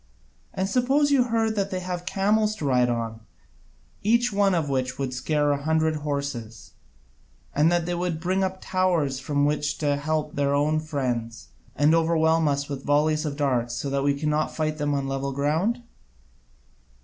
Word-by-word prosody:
And 190 0 -2
suppose 270 +6 +2
you 265 -3 +4
heard 225 -2 0
that 200 -1 0
they 185 - -3
have 180 -1 -5
camels 210 +3 +1
to 155 - -5
ride 125 -2 +3
on, 115 -2 -3 0.8
each 235 +2 +2
one 200 -2 +3
of 160 -3 0
which 130 -2 -1
would 135 -2 -3
scare 145 +3 +1
a 140 0 -1
hundred 160 +1 +1
horses, 140 -7 -5 0.8
and 150 +3 +3
that 175 -1 +1
they 175 - -2
will 175 +1 -1
bring 180 +4 -1
up 190 0 -2
towers 175 -8 0
from 145 +1 0
which 145 0 0
to 145 -2 0
help 150 +1 -2
their 140 0 +1
own 150 +2 +2
friends, 125 -7 -3 0.3
and 150 +2 +4
overwhelm 160 -1 +3
us 140 0 0
with 140 -1 -6
volleys 155 +2 +2
of 145 -1 -4
darts 125 -5 0
so 140 - -3
that 140 0 0
we 140 0 +1
cannot 150 0 0
fight 155 -1 -2
them 145 0 0
on 140 -1 -2
level 135 0 -2
ground? 160 - 0
150 Hz, 175 wpm, -25 LUFS, 140-180 Hz, 0.8 s, you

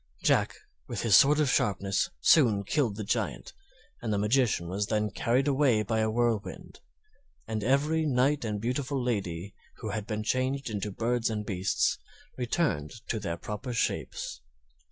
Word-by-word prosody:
Jack, - - +2 0.3
with - - -4
his 110 -4 +5
sword 145 +2 +6
of 150 - +3
sharpness, 100 - +1
soon 115 -10 +5
killed 120 -1 0
the 110 - -4
Giant, 100 - -2 0.5
and 115 - -2
the 105 - +1
magician 105 -4 +2
was 100 +3 -2
then 105 -1 0
carried 125 +7 +1
away 135 -6 +3
by 110 0 -1
a 110 0 +1
whirlwind; 115 -2 -2 0.7
and 110 -1 -3
every 150 +6 +2
knight 135 +1 +2
and 105 -2 -2
beautiful 130 +4 -2
lady 100 -6 -2 0.2
who 110 - -6
had 105 0 -4
been 105 -1 -3
changed 130 +2 -1
into 105 0 -3
birds 115 +3 0
and 105 -1 -3
beasts 95 -2 0 0.4
returned 125 - -1 0.2
to - - -1
their 85 0 -3
proper 110 +7 -5
shapes. 115 - -2
110 Hz, 155 wpm, -29 LUFS, 105-130 Hz, 0.7 s, sword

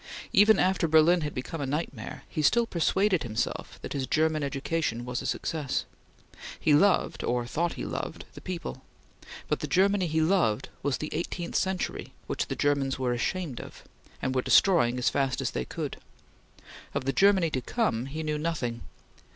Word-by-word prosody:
Even 210 +2 +6
after 185 -2 +2
Berlin 160 +3 +5
had 150 -1 -4
become 145 +5 -4
a 140 - -2
nightmare, 140 -5 -4
he 155 - -3
still 235 - +4
persuaded 190 -1 +1
himself 115 -5 -3
that - - -5
his 135 -2 -2
German 155 +2 +2
education 140 -3 -2
was 125 0 -3
a - - -4
success. 150 -5 -2 0.7
He 155 - +3
loved, 190 +6 +3
or 120 0 0
thought 170 +8 -1
he - - -5
loved - - -5
the - - -11
people, 175 - -5 0.7
but - - 0
the - - -3
Germany 195 0 +3
he 160 0 0
loved 160 - +2
was 140 -2 0
the 155 - -4
eighteenth 170 +2 -4
century 190 -1 -1
which - - -2
the - - -3
Germans 140 -2 +1
were 125 -2 0
ashamed 140 +2 -2
of, - - -12 0.4
and 130 - 0
were 130 - +1
destroying 125 -7 +4
as 125 - +1
fast 135 -2 0
as - - -1
they 60 - -3
could. - - -5 1.0
Of - - -1
the 135 - 0
Germany 190 0 +4
to 130 - -1
come, 130 - -1
he 155 +3 -5
knew 150 -1 -1
nothing. 130 -8 -2
155 Hz, 175 wpm, -28 LUFS, 130-175 Hz, 1.0 s, Even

